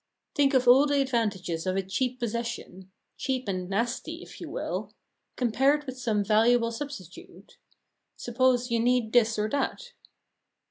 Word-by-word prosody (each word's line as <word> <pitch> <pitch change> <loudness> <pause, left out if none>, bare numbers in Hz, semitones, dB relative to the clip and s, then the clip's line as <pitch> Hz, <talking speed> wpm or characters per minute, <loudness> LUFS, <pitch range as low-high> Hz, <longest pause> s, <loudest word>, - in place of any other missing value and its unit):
Think 280 -2 +3
of 255 -1 +3
all 265 +4 +7
the 285 -1 +2
advantages 205 -10 -1
of 185 - 0
a 195 - 0
cheap 250 +7 -2
possession 235 -5 -4 0.3
cheap 260 -3 -2
and 185 -2 -3
nasty, 240 - -2
if - - -13
you - - -6
will - - -4 0.4
compared 270 +5 +2
with 260 -2 -7
some 220 -5 0
valuable 230 +2 +3
substitute. 230 - -9 0.6
Suppose 245 0 +1
you 230 - +2
need 240 -1 +1
this 230 -2 +4
or 210 0 0
that. 385 - -2
240 Hz, 145 wpm, -27 LUFS, 210-260 Hz, 0.6 s, all